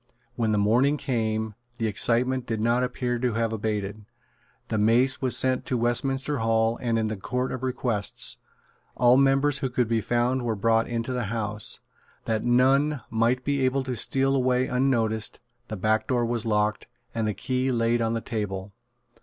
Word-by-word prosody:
When 115 -2 0
the 105 - +1
morning 120 +8 +3
came, 110 -5 -2 0.2
the 115 - -2
excitement 120 +4 +1
did 115 -1 -2
not 120 +3 +2
appear 125 -1 -2
to 125 -1 0
have 115 0 -1
abated. 105 -1 -3 0.7
The 110 - 0
mace 120 +5 +3
was 130 -2 +3
sent 130 -1 +2
into 125 - -3
Westminster 135 +4 -1
Hall 115 0 +1
and 115 -2 0
into 110 -1 -1
the 100 - -9
Court 125 +4 -2
of 130 - -5
Requests. 125 -5 0 0.6
All 125 0 +5
members 135 +1 +3
who 130 - -1
could 125 -2 0
be 115 0 +1
found 120 +4 0
were 115 -2 -1
brought 115 +2 +2
into 120 +2 -3
the 125 -2 -2
House. 105 -1 -2 0.4
That 110 -1 -1
none 135 +4 +3
might 115 +3 +1
be 140 -2 0
able 130 +1 +1
to 130 -1 -3
steal 135 +3 +1
away 130 -1 +2
unnoticed, 115 -4 0 0.3
the 110 - -5
back 110 +3 +1
door 120 -3 +1
was 115 -1 -2
locked, 105 0 0 0.3
and 115 -1 -1
the 105 - -2
key 130 +5 -1
laid 115 0 +1
on 115 0 0
the 115 - -2
table. 100 -4 -4
120 Hz, 180 wpm, -26 LUFS, 110-130 Hz, 0.7 s, All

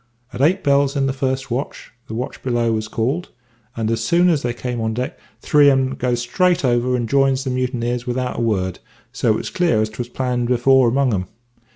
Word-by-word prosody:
At - - -4
eight 180 +7 +3
bells 140 -1 +2
in 140 -1 +1
the 135 - 0
first 130 -1 -2
watch, 130 +4 -4 0.2
the 110 - -6
watch 125 +3 -5
below 120 -2 0
was 110 -1 -2
called; 130 +11 -2 0.5
and 110 -1 -1
as 115 0 -1
soon 175 +9 +3
as 155 -5 +2
they 120 - -1
came 120 0 -4
on 110 0 -1
deck 125 +2 -4 0.2
three 145 -1 +5
on 135 -1 +4
'em 130 0 0
goes 125 -2 -1
straight 175 +6 +1
over 125 0 +1
and 120 -2 -1
jines 135 0 +2
the 130 - -2
mutineers 125 -1 -2
without 125 0 -2
a - - -1
word; 95 -5 -1 0.3
so - - -1
it - - +4
was - - -5
clear 170 -12 +2
as 110 0 0
'twas 120 +2 -5
all - - -27
planned 125 -2 -1
afore 125 +1 +4
among 130 0 +1
'em. 90 -2 -1
125 Hz, 225 wpm, -20 LUFS, 120-135 Hz, 0.5 s, three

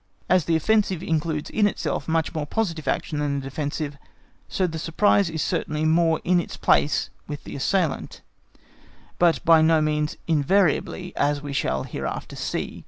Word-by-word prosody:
As 180 -4 +3
the 165 - +2
offensive 190 0 +1
includes 155 -2 -2
in 210 -1 +3
itself 145 - -3
much 160 0 0
more 155 -2 -3
positive 165 -6 -2
action 150 - -1
than 145 -1 -1
the - - -7
defensive, 145 +1 -4 0.5
so 190 - 0
the 160 -2 -3
surprise 190 +3 +2
is 160 -2 -2
certainly 155 -3 -1
more 165 0 +3
in 180 0 +3
its - - -5
place 145 - +2 0.2
with 145 -1 -6
the - - -8
assailant, 165 +3 -1 1.0
but 170 -2 +3
by 165 -1 +7
no 160 0 +4
means 150 0 0
invariably, 180 +3 +1
as 145 0 0
we 145 -1 -5
shall 65 - 0
hereafter - - -5
see. - - -4
160 Hz, 165 wpm, -24 LUFS, 150-175 Hz, 1.0 s, by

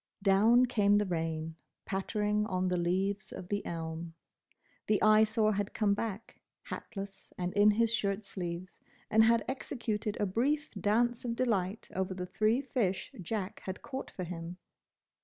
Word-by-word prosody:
Down 220 +6 +6
came 205 -4 +3
the 205 0 +3
rain, 160 -2 -2 0.3
pattering 210 +2 0
on 185 -1 0
the 180 - +1
leaves 190 +4 0
of 180 - -8
the 205 0 -1
elm. 165 0 -5 0.7
The 210 - +3
Eyesore 215 0 +5
had 205 0 -2
come 205 -2 +3
back, 215 +1 -5 0.2
hatless 195 -2 -7
and 180 0 -2
in 205 +1 +6
his 230 +2 +3
shirt 200 -1 -1
sleeves, 180 -1 -5 0.3
and 220 +1 +6
had 230 0 +4
executed 230 -5 -3
a 205 - +2
brief 280 +10 0
dance 230 +4 +1
of 235 -2 -2
delight 215 -4 0
over 190 0 -1
the 180 -1 -4
three 215 +7 +2
fish 220 -9 -1
Jack 195 +1 -3
had 190 +1 -5
caught 265 0 -5
for 185 - -6
him. 170 0 -6
205 Hz, 155 wpm, -32 LUFS, 185-225 Hz, 0.7 s, Down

